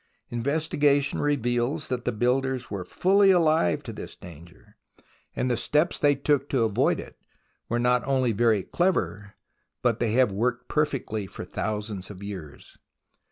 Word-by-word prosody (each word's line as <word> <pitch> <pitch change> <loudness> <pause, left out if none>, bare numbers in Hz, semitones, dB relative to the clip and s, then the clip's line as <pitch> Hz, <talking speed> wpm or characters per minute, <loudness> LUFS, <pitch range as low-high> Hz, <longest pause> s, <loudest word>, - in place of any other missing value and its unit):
Investigation 145 +2 +1
reveals 135 +1 0
that 125 -2 -3
the - - +1
builders 125 +3 0
were 100 -3 -3
fully 195 - +3
alive 160 - +3
to - - -7
this - - -8
danger, 90 +5 -14 0.6
and - - -1
the - - +2
steps 150 +8 +1
they 145 -1 +4
took 140 0 0
to 130 -4 +2
avoid 110 -3 +1
it - - -10 0.5
were 120 - 0
not 125 +1 +2
only 130 -3 +2
very 110 -2 +2
clever, 105 - -1 0.5
but 120 -2 +2
they 115 -2 0
have 125 -3 +4
worked 125 +5 -1
perfectly 135 -9 -1
for - - -8
thousands 105 -3 -4
of 100 -1 -10
years. 95 -8 -9
120 Hz, 150 wpm, -26 LUFS, 105-145 Hz, 0.6 s, they